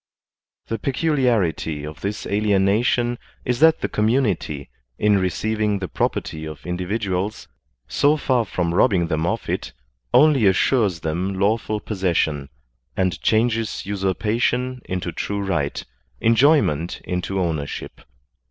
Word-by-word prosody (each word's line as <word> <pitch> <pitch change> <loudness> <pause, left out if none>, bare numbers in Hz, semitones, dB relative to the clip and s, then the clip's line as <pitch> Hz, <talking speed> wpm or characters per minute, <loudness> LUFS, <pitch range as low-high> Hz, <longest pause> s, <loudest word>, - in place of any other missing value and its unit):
The 115 - -3
peculiarity 120 - 0
of 75 +1 -9
this 100 +2 -3
alienation 105 +4 +2 0.3
is 125 -1 0
that 160 +1 +5
the - - 0
community, 105 - 0 0.3
in 105 -1 +3
receiving 105 +3 0
the 95 -1 -4
property 80 -2 -2
of 80 -1 -8
individuals, 95 +2 -2 0.4
so 145 +2 +3
far 130 -5 +1
from 85 -3 -1
rob 90 - +5
bing 85 -4 0
them 80 0 0
of - - -2
it, - - -3 0.4
only 145 - +5
assures 95 -2 +2
them 90 +5 -2
lawful 105 +1 +1
possession, 85 -9 -1 0.5
and 90 -3 0
changes 115 0 +1
usurpation 115 +6 -1
into 90 -2 -3
true 100 +5 -3
right, 85 -8 -2 0.3
enjoyment 115 - +3
into 90 +2 -2
ownership. 80 -5 -3
100 Hz, 120 wpm, -22 LUFS, 90-115 Hz, 0.5 s, that